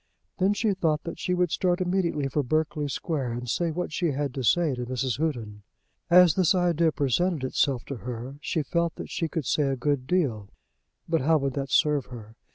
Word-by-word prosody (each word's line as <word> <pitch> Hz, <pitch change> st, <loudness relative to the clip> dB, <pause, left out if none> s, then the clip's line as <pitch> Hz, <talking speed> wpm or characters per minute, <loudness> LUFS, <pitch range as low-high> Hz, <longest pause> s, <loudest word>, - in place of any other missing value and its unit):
Then 195 Hz, +2 st, +3 dB
she 210 Hz, 0 st, +1 dB
thought 165 Hz, -5 st, 0 dB
that 170 Hz, -, -6 dB
she 180 Hz, -, 0 dB
would 180 Hz, -2 st, +1 dB
start 180 Hz, -1 st, +1 dB
immediately 175 Hz, -6 st, 0 dB
for 145 Hz, +2 st, 0 dB
Berkeley 150 Hz, +2 st, -1 dB
Square, 135 Hz, -3 st, -2 dB
and 120 Hz, +1 st, -5 dB
say 170 Hz, +9 st, 0 dB
what 165 Hz, 0 st, -3 dB
she 175 Hz, -, 0 dB
had 140 Hz, -1 st, -2 dB
to 135 Hz, -, -4 dB
say 160 Hz, +4 st, +2 dB
to 125 Hz, -1 st, -4 dB
Mrs. 130 Hz, 0 st, -2 dB
Houghton. 115 Hz, -10 st, -3 dB, 0.5 s
As 180 Hz, -2 st, +7 dB
this 185 Hz, 0 st, +3 dB
idea 170 Hz, -2 st, +2 dB
presented 150 Hz, +3 st, 0 dB
itself 130 Hz, -1 st, 0 dB
to 140 Hz, -, -5 dB
her, 125 Hz, +3 st, -6 dB
she 160 Hz, 0 st, -1 dB
felt 170 Hz, +3 st, -1 dB
that -, -, -8 dB
she 165 Hz, -, -1 dB
could 160 Hz, -3 st, -3 dB
say 145 Hz, +2 st, +1 dB
a 135 Hz, -, 0 dB
good 130 Hz, 0 st, -1 dB
deal. 130 Hz, -, 0 dB, 0.6 s
But 165 Hz, -2 st, +1 dB
how 160 Hz, +4 st, +4 dB
would 135 Hz, -2 st, -1 dB
that 135 Hz, 0 st, -3 dB
serve 150 Hz, -2 st, +2 dB
her? 115 Hz, -3 st, -11 dB
150 Hz, 205 wpm, -26 LUFS, 130-170 Hz, 0.6 s, As